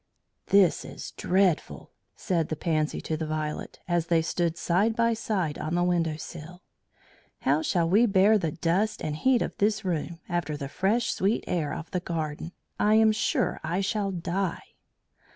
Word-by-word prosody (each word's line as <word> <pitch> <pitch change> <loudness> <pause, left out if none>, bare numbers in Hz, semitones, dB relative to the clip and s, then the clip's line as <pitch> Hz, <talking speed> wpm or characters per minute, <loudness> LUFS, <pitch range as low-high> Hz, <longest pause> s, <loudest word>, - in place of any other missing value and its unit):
"This 195 -4 +4
is - - -8
dreadful," 185 -3 0 0.2
said 170 -4 -1
the 155 - -1
Pansy 155 -1 -1
to 160 - -2
the 155 0 -3
Violet, 155 -1 -4
as 175 -1 0
they 165 -1 +3
stood 170 0 -1
side 200 +6 +1
by 230 0 +2
side 195 -9 -2
on 160 +2 -2
the 175 - +2
window 170 -3 +1
sill. 170 +3 -9 0.8
"How 145 +3 +2
shall 170 0 +1
we 210 +7 +4
bear 205 +2 +4
the 165 -4 -1
dust 180 +8 0
and 150 - -2
heat 255 +8 +2
of - - -5
this 210 0 +1
room 170 -1 -2
after 170 -4 -2
the 140 -2 -5
fresh 215 +9 +1
sweet 200 +4 0
air 160 -5 -1
of 165 - -6
the 180 - 0
garden? 160 -2 -4 0.3
I 210 +1 +4
am 220 0 +6
sure 215 - 0
I 180 +3 -1
shall 200 +1 -1
die." 180 0 -3
175 Hz, 170 wpm, -27 LUFS, 160-200 Hz, 0.8 s, am